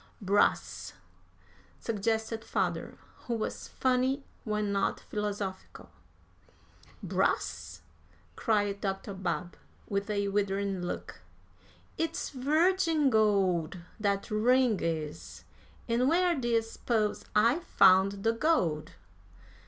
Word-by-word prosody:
"Brass," 200 0 +1 0.9
suggested 220 +1 -1
father, - - -2 0.3
who 235 - 0
was 220 - -4
funny 260 +2 +1 0.2
when 210 -2 -1
not 200 0 0
philosophical. 205 -2 -5 1.1
"Brass!" - - -1 0.5
cried 205 -3 0
Dr. 195 0 -3
Babb, 180 -2 -3 0.3
with 200 +1 -2
a 200 -1 0
withering 195 -1 -1
look; 175 - -5 0.8
"it's 325 - -2
virgin 310 +2 +2
gold, 195 -7 +2 0.2
that 200 +1 -1
ring 240 +1 +3
is. 160 -1 -4 0.4
And 245 +3 +2
where 350 +2 +3
d'ye 240 -6 +1
s'pose 225 -1 -1
I 230 +8 +4
found 195 - +4
the 225 - +3
gold?" 180 - +1
210 Hz, 95 wpm, -30 LUFS, 195-250 Hz, 1.1 s, I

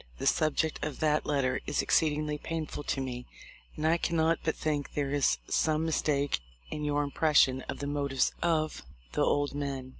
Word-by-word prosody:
The - - -5
subject 155 0 +1
of 150 -3 -4
that 155 -1 +2
letter 135 -3 +1
is - - +1
exceedingly 150 -1 +1
painful 160 -2 -4
to - - -1
me, 125 -2 -4 0.5
and 155 - -3
I 165 +2 +4
can 170 0 -1
not 160 +1 +3
but 160 - 0
think 150 -2 -2
there 140 -2 0
is 140 - +2
some 155 0 +1
mistake 145 - +1 0.3
in 150 - -4
your 145 0 +1
im 140 - -4
pression 140 -5 +4
of - - -3
the 140 - -4
motives 140 -2 0
of 155 -2 +1 0.3
the - - -1
old 145 -1 +1
men. 140 -2 -4
150 Hz, 185 wpm, -30 LUFS, 140-155 Hz, 0.5 s, I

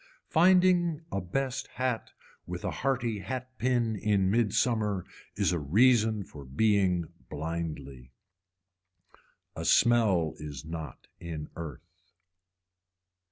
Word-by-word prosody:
Finding 175 -2 +4
a 100 - -1
best 130 +8 -2
hat 125 -3 -1 0.4
with 90 0 -5
a - - -1
hearty 120 -5 -1
hat 130 +5 -5
pin 120 -2 +1
in 100 -2 +1
midsummer 110 -3 +1 0.3
is - - +1
a 85 - 0
reason 110 - +3
for 75 -5 -11
being 90 +3 +1 0.2
blindly. 75 -5 -5 1.5
A - - -5
smell 105 -9 +4
is 75 -4 -7
not 80 -1 -7
in 80 -3 -6
earth. 85 0 -8
100 Hz, 105 wpm, -29 LUFS, 85-120 Hz, 1.5 s, Finding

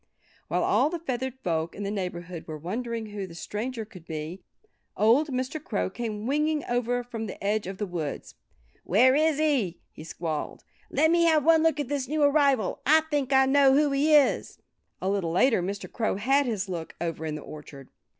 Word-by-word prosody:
While - - 0
all - - +3
the 345 - -3
feathered 260 -5 -3
folk 165 -1 -1
in 205 - -5
the 200 - -2
neighborhood 180 -3 -5
were 155 -1 -5
wondering 220 +6 -4
who 200 -2 -5
the 170 - -12
stranger 225 +6 -4
could 185 -6 -14
be 160 +4 -6 0.6
old 235 +9 +4
Mr. 265 +3 -3
Crow 90 - -2
came 220 -3 -4
winging 300 +2 0
over 245 0 -1
from 225 -2 -6
the - - -8
edge 205 0 0
of 190 0 -6
the 210 - -2
woods. 170 -6 -5 0.5
"Where 245 +8 +4
is 310 +1 +2
he?" 275 - +1
he - - -11
squalled. 160 -1 -5 0.3
"Let 315 +3 +3
me 340 0 +4
have 310 -3 +3
one 325 -1 +6
look 320 -2 +2
at 290 - -2
this 275 -1 -2
new 305 +2 0
arrival! 280 -7 +3
I 315 +3 +5
think 285 -2 0
I 265 0 +5
know 270 0 +5
who 295 0 +3
he 295 +3 +3
is." 290 -3 +2 0.5
A - - 0
little 190 -4 0
later 225 +2 +3
Mr. 195 +3 -4
Crow 225 -4 -1
had 270 +7 +2
his 205 -4 -2
look, 170 -4 -6
over 165 -2 -3
in 155 -1 -3
the 150 - -6
orchard. 145 -3 -11
230 Hz, 200 wpm, -27 LUFS, 180-280 Hz, 0.6 s, one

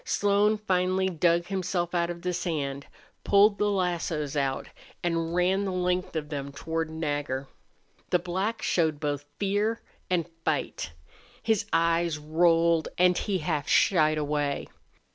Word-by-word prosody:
Slone 205 +1 +2
finally 190 -2 +1
dug 170 0 +2
himself 180 -2 -2
out 170 -1 +1
of 170 0 -6
the 180 0 -1
sand, 145 -6 -3 0.4
pulled 205 +1 +5
the 210 - +2
lassos 170 -6 -1
out, 135 -2 -1 0.4
and 165 -1 -1
ran 185 +3 +2
the 195 - -2
length 180 -1 -1
of 150 -2 -3
them 140 -2 -4
toward 160 +3 -3
Nagger. 145 -4 -3 0.6
The - - +4
black 190 +6 -2
showed 160 -4 +1
both 145 -1 -2
fear 205 +3 0 0.3
and 175 -3 +1 0.2
fight. 80 - -2 0.5
His 220 -3 +1
eyes 165 0 +2
rolled 165 +1 +3
and 180 0 +5
he 200 0 -1
half 150 -3 -2
shied 155 -4 +4
away. 145 -1 -1
170 Hz, 140 wpm, -27 LUFS, 155-185 Hz, 0.6 s, pulled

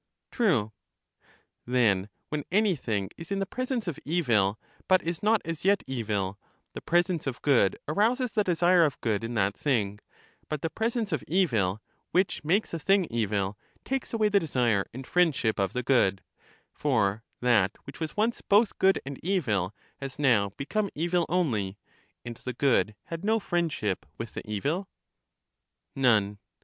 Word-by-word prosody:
Tme. 150 - +2 1.0
Then 105 -6 +2 0.2
when 150 -1 -2
anything 150 - +1
is 165 +3 -9
in 200 - 0
the 195 - 0
presence 255 0 -3
of 165 - -3
evil, 115 - +1 0.3
but 185 0 +4
is 170 0 -3
not 215 +1 +3
as 165 -2 -4
yet 200 +2 +3
evil, 105 -6 -2 0.3
the - - -7
presence 175 -2 +1
of 130 - -3
good 125 -9 +3
arouses 230 - +1
the 210 - +2
desire 175 -1 +4
of 145 -5 0
good 110 -2 0
in 115 +1 -4
that 100 -1 +1
thing; 105 -8 0 0.5
but 155 -2 -3
the 165 - -1
presence 225 -2 -1
of 155 - -1
evil, 115 - +1 0.3
which 185 -2 +1
makes 185 +7 +1
a 165 - -2
thing 195 +3 +3
evil, 105 -3 -1 0.3
takes 270 -1 -2
away 220 -2 +2
the 205 -1 +4
desire 120 - +1
and 130 +2 -8
friendship 145 - +2
of 95 -2 +1
the 125 - -2
good; 100 -7 +2 0.5
for 110 -7 +1 0.2
that 110 -6 +3
which 140 - -11
was 160 +2 -4
once 225 +3 +1
both 205 +2 +3
good 190 0 +4
and 140 -1 -6
evil 115 - 0 0.3
has 135 -1 -7
now 120 -9 +3
become 200 +9 -1
evil 170 +2 0
only, 110 - 0 0.5
and 120 -1 -6
the 125 - -5
good 120 -4 +2
had 165 +1 -7
no 220 +2 +2
friendship 165 - -1
with - - -6
the - - -5
evil? 150 - -2 1.1
None. 105 -6 +2
145 Hz, 160 wpm, -28 LUFS, -, 1.1 s, but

